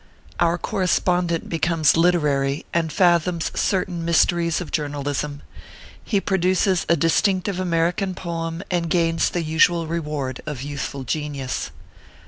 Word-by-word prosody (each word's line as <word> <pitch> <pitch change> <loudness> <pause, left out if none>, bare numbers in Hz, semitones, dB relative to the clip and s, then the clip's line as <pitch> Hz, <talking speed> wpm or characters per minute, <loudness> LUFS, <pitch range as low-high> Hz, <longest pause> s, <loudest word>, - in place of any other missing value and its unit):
OUR 170 0 +2
CORRESPONDENT 180 -2 0
BECOMES 165 -2 +2
LITERARY, 150 -5 +2
AND 165 -2 0
FATHOMS 175 -2 +2
CERTAIN 180 -3 -1
MYS 170 -1 +4
TERIES 170 -2 -1
OF 180 - -7
JOURNALISM. 145 -1 -3 0.6
HE 200 -4 0
PRODUCES 185 -1 +1
A 170 - +5
DISTINCTIVE 185 +4 +1
AMERICAN 180 +2 0
POEM, 165 0 -4
AND 170 -2 0
GAINS 165 -1 +2
THE 175 - -2
USUAL 165 +2 +3
REWARD 150 -5 -3
OF 140 -4 -4
YOUTHFUL 140 -1 -5
GENIUS. 140 0 -3
165 Hz, 120 wpm, -22 LUFS, 150-175 Hz, 0.6 s, A